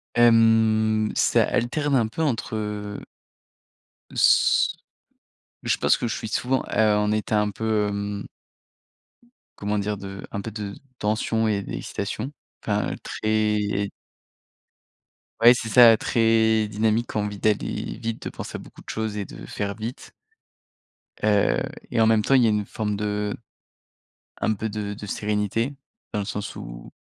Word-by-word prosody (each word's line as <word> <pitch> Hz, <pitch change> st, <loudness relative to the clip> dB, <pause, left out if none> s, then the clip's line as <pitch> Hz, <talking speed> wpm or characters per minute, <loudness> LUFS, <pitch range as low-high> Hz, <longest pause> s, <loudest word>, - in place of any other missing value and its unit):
Hem, 110 Hz, -2 st, +4 dB
ça -, -, +4 dB
alterne 145 Hz, +4 st, 0 dB
un 115 Hz, -4 st, +3 dB
peu 140 Hz, +9 st, -5 dB
entre, 120 Hz, -7 st, -1 dB
heu 105 Hz, -1 st, -4 dB, 1.1 s
s -, -, +4 dB, 0.9 s
je -, -, +1 dB
pense -, -, +3 dB
que 120 Hz, -, -2 dB
je 115 Hz, -, -2 dB
suis 110 Hz, -, -5 dB
souvent, 130 Hz, +4 st, 0 dB
heu, 110 Hz, -1 st, +3 dB
en 105 Hz, 0 st, +1 dB
état 110 Hz, 0 st, +1 dB
un 105 Hz, 0 st, +1 dB
peu, 110 Hz, 0 st, 0 dB
hem 100 Hz, 0 st, -3 dB, 1.3 s
comment 105 Hz, +1 st, -1 dB
dire? 105 Hz, +1 st, -2 dB
De 100 Hz, 0 st, -8 dB
un -, -, -3 dB
peu 110 Hz, -, -6 dB
de 105 Hz, -2 st, -6 dB, 0.2 s
tension 110 Hz, +1 st, 0 dB
et 100 Hz, -2 st, 0 dB
d'excitation, 105 Hz, +7 st, -4 dB, 0.3 s
enfin -, -, 0 dB
très 105 Hz, -2 st, 0 dB, 1.5 s
ouais, 120 Hz, +1 st, +9 dB
c'est 120 Hz, -2 st, -4 dB
ça, 115 Hz, +1 st, +8 dB
très 110 Hz, -1 st, +3 dB
dynamique, 110 Hz, +2 st, 0 dB
envie 105 Hz, -1 st, -1 dB
d'aller 105 Hz, +1 st, -1 dB
vite, 115 Hz, -1 st, -4 dB
de -, -, -3 dB
penser -, -, -7 dB
à -, -, -4 dB
beaucoup -, -, -14 dB
de -, -, -14 dB
choses 110 Hz, -1 st, -3 dB
et 100 Hz, -, -3 dB
de -, -, -10 dB
faire 100 Hz, -1 st, -4 dB
vite 115 Hz, +4 st, -7 dB, 1.1 s
heu 105 Hz, -1 st, +3 dB, 0.3 s
et -, -, 0 dB
en 110 Hz, -, +5 dB
même 110 Hz, -1 st, +4 dB
temps 135 Hz, -, +3 dB
il 125 Hz, -, +5 dB
y -, -, +5 dB
a -, -, +4 dB
une 105 Hz, -1 st, 0 dB
forme 105 Hz, 0 st, -3 dB
de 105 Hz, 0 st, -2 dB, 1.0 s
un 110 Hz, -, +1 dB
peu 110 Hz, +1 st, -3 dB
de 105 Hz, -1 st, -4 dB
de 105 Hz, -, -8 dB
sérénité 105 Hz, +5 st, -1 dB, 0.4 s
dans 105 Hz, -, 0 dB
le 100 Hz, -, -2 dB
sens 105 Hz, 0 st, -5 dB
où -, -, -9 dB
110 Hz, 155 wpm, -24 LUFS, 105-110 Hz, 1.5 s, ouais